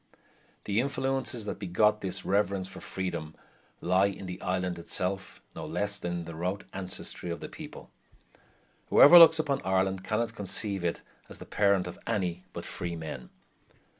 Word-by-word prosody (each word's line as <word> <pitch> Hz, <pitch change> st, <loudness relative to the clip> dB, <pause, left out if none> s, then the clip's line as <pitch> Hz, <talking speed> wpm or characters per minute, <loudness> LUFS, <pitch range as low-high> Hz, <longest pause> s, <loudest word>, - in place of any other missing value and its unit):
The 105 Hz, +1 st, 0 dB
influences 135 Hz, -3 st, -1 dB
that 105 Hz, -, -4 dB
begot 105 Hz, +3 st, +2 dB
this 95 Hz, 0 st, -3 dB
reverence 100 Hz, -1 st, +1 dB
for -, -, -10 dB
freedom 85 Hz, -4 st, -4 dB, 0.5 s
lie 95 Hz, +3 st, +3 dB
in 100 Hz, -1 st, -6 dB
the 90 Hz, 0 st, -7 dB
island 90 Hz, -1 st, -1 dB
itself 95 Hz, +3 st, -3 dB
no -, -, -6 dB
less 105 Hz, 0 st, -2 dB
than 85 Hz, -, -3 dB
in 85 Hz, -1 st, -3 dB
the 85 Hz, -, -7 dB
remote 90 Hz, +5 st, -3 dB
ancestry 95 Hz, -2 st, -5 dB
of 85 Hz, -, -3 dB
the -, -, -6 dB
people. -, -, -10 dB, 1.0 s
Whoever 175 Hz, +5 st, +10 dB
looks 165 Hz, -1 st, +9 dB
upon 145 Hz, -3 st, 0 dB
Ireland 95 Hz, 0 st, +1 dB
cannot 110 Hz, +3 st, -1 dB
conceive 100 Hz, -1 st, -1 dB
it 85 Hz, -1 st, -2 dB, 0.3 s
as -, -, -7 dB
the -, -, -10 dB
parent 100 Hz, -3 st, +2 dB
of 90 Hz, -, -8 dB
any 90 Hz, -5 st, -1 dB
but -, -, -7 dB
freemen. 80 Hz, -8 st, -5 dB
95 Hz, 160 wpm, -29 LUFS, 90-105 Hz, 1.0 s, Whoever